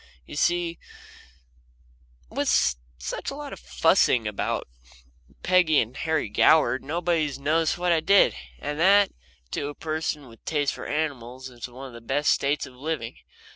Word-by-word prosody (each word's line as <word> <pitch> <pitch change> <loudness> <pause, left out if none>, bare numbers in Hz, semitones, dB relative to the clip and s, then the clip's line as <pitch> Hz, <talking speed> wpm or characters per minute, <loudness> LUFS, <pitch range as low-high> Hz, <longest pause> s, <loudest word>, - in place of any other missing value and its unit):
You - - -9
see, 175 +2 +1 1.5
with - - -1 0.5
such 65 0 -4
a 275 - -6
lot 290 -1 -7
of - - -9
fussing 130 - +3
about 105 - -2 0.8
Peggy 180 -5 +4
and 115 +3 -2
Harry 160 -6 -1
Goward, 130 +3 +4
nobody 165 +1 0
has 140 - -6
noticed 155 +4 +1
what 175 0 +1
I 165 - +4
did, 195 +5 +5 0.2
and 150 - -5
that, 200 +3 +5 0.4
to 140 - -2
a 145 - -6
person 155 -3 -3
with 115 -1 -16
a - - -52
taste 145 -3 0
for - - -7
animals, 130 -4 -3
is 120 0 -7
one 125 +2 -10
of 130 - -10
the 115 - -10
best 145 +5 +1
states 140 +1 +1
of 130 - -13
living. 125 - -4
150 Hz, 165 wpm, -25 LUFS, 130-165 Hz, 1.5 s, did